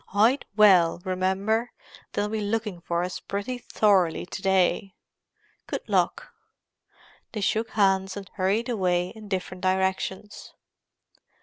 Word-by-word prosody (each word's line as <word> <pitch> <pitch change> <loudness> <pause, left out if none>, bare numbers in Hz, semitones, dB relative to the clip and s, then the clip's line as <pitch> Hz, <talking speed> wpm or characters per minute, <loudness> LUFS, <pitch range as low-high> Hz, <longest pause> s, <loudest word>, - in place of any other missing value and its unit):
Hide 225 +7 +3
well, 185 -6 +5
remember; 190 +5 0 0.4
they'll 205 - 0
be 215 0 -3
looking 210 -3 -2
for 170 0 -1
us 180 0 -4
pretty 205 +6 -4
thoroughly 195 -8 +2
to 190 - -7
day. 190 0 +1 0.7
Good - - -5
luck!" - - 0 1.0
They 215 - -3
shook 220 +3 0
hands 195 -2 +1
and 195 -1 -7
hurried 205 +5 0
away 180 -6 0
in 220 0 -11
different 185 -1 -4
directions. 190 +2 -2
195 Hz, 120 wpm, -26 LUFS, 185-215 Hz, 1.0 s, well